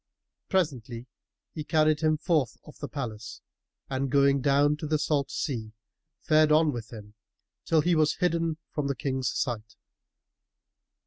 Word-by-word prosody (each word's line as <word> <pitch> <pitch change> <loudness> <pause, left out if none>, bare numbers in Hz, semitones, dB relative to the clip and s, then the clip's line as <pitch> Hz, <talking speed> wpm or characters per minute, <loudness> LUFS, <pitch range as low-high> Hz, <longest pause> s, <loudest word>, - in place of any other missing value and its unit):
Presently 125 -10 -1 0.5
he 155 - -5
carried 155 -1 +2
him 155 -1 +2
forth 155 -6 0
of 150 - -14
the 145 - -5
palace 115 -6 -6 0.5
and 135 0 -2
going 140 0 +3
down 145 +2 +3
to 150 - -5
the 155 +1 +1
salt 145 -2 0
sea, 110 -7 -4 0.5
fared 155 -1 +4
on 155 0 +4
with 120 -3 -7
him, 105 -2 -10 0.5
till 160 -2 +3
he 175 +3 +2
was 155 -2 +3
hidden 165 -3 0
from 150 -2 -2
the 140 - -1
King's 130 +1 -2
sight. 115 -4 -3
145 Hz, 145 wpm, -27 LUFS, 125-155 Hz, 0.5 s, fared